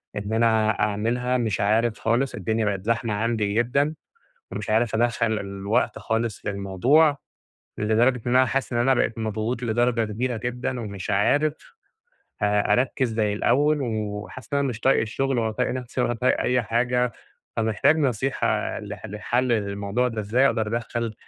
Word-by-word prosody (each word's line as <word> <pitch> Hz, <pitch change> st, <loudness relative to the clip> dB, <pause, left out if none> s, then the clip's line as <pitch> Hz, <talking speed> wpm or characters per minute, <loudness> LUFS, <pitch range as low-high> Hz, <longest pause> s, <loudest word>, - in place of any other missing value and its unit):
إن 105 Hz, +1 st, -4 dB
أنا 110 Hz, -1 st, +2 dB
أعملها، 115 Hz, +5 st, 0 dB
مش 110 Hz, -6 st, -1 dB
عارف 110 Hz, +3 st, +1 dB
خالص، 120 Hz, +4 st, 0 dB
الدنيا 110 Hz, +3 st, -1 dB
بقت 100 Hz, -1 st, -2 dB
زحمة 115 Hz, -1 st, 0 dB
عندي 105 Hz, -1 st, 0 dB
جدًا، 140 Hz, +7 st, +1 dB, 0.6 s
ومش -, -, -5 dB
عارف 110 Hz, +1 st, +2 dB
أدخل 115 Hz, -1 st, +1 dB
الوقت 100 Hz, +2 st, -1 dB
خالص 115 Hz, -1 st, -2 dB
في -, -, -3 dB
الموضوع، 120 Hz, -, +3 dB, 0.6 s
لدرجة 115 Hz, +4 st, +2 dB
إن 120 Hz, +1 st, +2 dB
أنا 130 Hz, 0 st, +5 dB
حاسس 130 Hz, +2 st, -2 dB
إن 120 Hz, -, 0 dB
أنا 130 Hz, +2 st, +3 dB
بقيت 115 Hz, -2 st, 0 dB
مضغوط 110 Hz, +2 st, -2 dB
لدرجة 120 Hz, 0 st, +1 dB
كبيرة 120 Hz, +3 st, -2 dB
جدًا، 125 Hz, +2 st, -3 dB
ومش 100 Hz, -4 st, -6 dB
عارف 145 Hz, +10 st, +2 dB, 0.9 s
أ 105 Hz, 0 st, +2 dB
أركز 125 Hz, -2 st, 0 dB
زي 105 Hz, -2 st, +1 dB
الأوّل، 145 Hz, +8 st, +2 dB
وحاسس 110 Hz, +1 st, -5 dB
إن 140 Hz, -, +3 dB
أنا 140 Hz, -, +1 dB
مش 115 Hz, -3 st, -4 dB
طايق 135 Hz, +3 st, +3 dB
الشغل، 125 Hz, +3 st, -1 dB
ولا 110 Hz, -1 st, 0 dB
طايق 110 Hz, -, -1 dB
نفسي 125 Hz, 0 st, -3 dB
ولا 120 Hz, -1 st, 0 dB
أي 125 Hz, 0 st, +2 dB
حاجة. 125 Hz, +2 st, 0 dB, 0.5 s
فمحتاج 110 Hz, +7 st, +2 dB
نصيحة 135 Hz, -6 st, 0 dB
ل 105 Hz, -1 st, -9 dB, 0.2 s
لحل 120 Hz, +4 st, -1 dB
الموضوع 100 Hz, +2 st, 0 dB
ده 115 Hz, -3 st, -4 dB
إزاي، 120 Hz, +6 st, +2 dB
أقدر 110 Hz, -4 st, +1 dB
أدخل 115 Hz, -1 st, -4 dB
115 Hz, 160 wpm, -24 LUFS, 105-125 Hz, 0.9 s, أنا